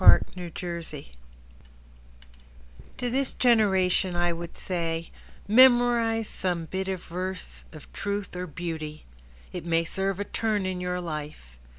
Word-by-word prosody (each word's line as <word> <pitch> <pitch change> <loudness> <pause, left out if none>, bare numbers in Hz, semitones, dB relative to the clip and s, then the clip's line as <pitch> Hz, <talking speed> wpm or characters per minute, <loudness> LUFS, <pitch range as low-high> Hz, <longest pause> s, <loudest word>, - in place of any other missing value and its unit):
Mrs. 180 -2 +5
George - - -5
Reece 170 -4 -5 1.9
To 245 -1 -2
this 270 +1 0
generation 190 -6 +3
I 175 0 +2
would 170 0 -7
say: 165 -2 -2 0.4
Memorize 235 -1 +5
some 175 -3 -2
bit 190 +4 -3
of 190 -2 -3
verse 185 +2 -5
of 155 -2 -13
truth 200 -1 -3
or 180 0 -3
beauty. 155 -2 -5 0.5
It - - -4
may 165 0 +2
serve 195 +2 -1
a 205 - -1
turn 210 -2 0
in 185 -1 -2
your 180 0 -1
life. 150 - -6
180 Hz, 130 wpm, -27 LUFS, 170-205 Hz, 1.9 s, Mrs